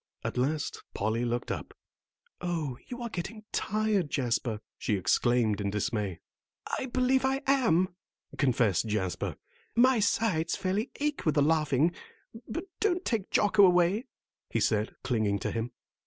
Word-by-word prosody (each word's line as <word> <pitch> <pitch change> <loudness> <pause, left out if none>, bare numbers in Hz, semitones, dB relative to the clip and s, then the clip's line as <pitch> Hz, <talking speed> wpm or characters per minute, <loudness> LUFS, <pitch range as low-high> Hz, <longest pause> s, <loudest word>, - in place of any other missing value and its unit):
At - - -3
last 145 +4 -1
Polly 110 +3 0
looked 120 0 -2
up, - - -5 0.7
"Oh, 165 -7 -2
you 245 -1 -6
are 235 - -3
getting 215 +3 -5
tired, 210 -5 0
Jasper," 120 -4 0 0.2
she 105 - 0
exclaimed 110 +2 +2
in 100 - 0
dismay. 105 -2 -2 0.6
"I 260 - -3
believe 255 +1 +2
I 270 +1 +1
am," 235 -10 +3 0.5
confessed 115 - +2
Jasper; 100 -4 -2 0.4
"my 250 +1 +5
sides 200 -6 +1
fairly 195 +4 -1
ache 295 0 -1
with 155 - +1
the 145 - +4
laughing. 155 0 +3 0.6
But 290 +9 -3 0.2
don't 370 -3 +1
take 220 -5 -1
Jocko 205 0 +4
away," 180 +5 +4 0.4
he 115 - 0
said, 110 +1 +1
clinging 110 -6 +1
to - - -3
him. 115 +1 -2
160 Hz, 140 wpm, -29 LUFS, -, 0.7 s, my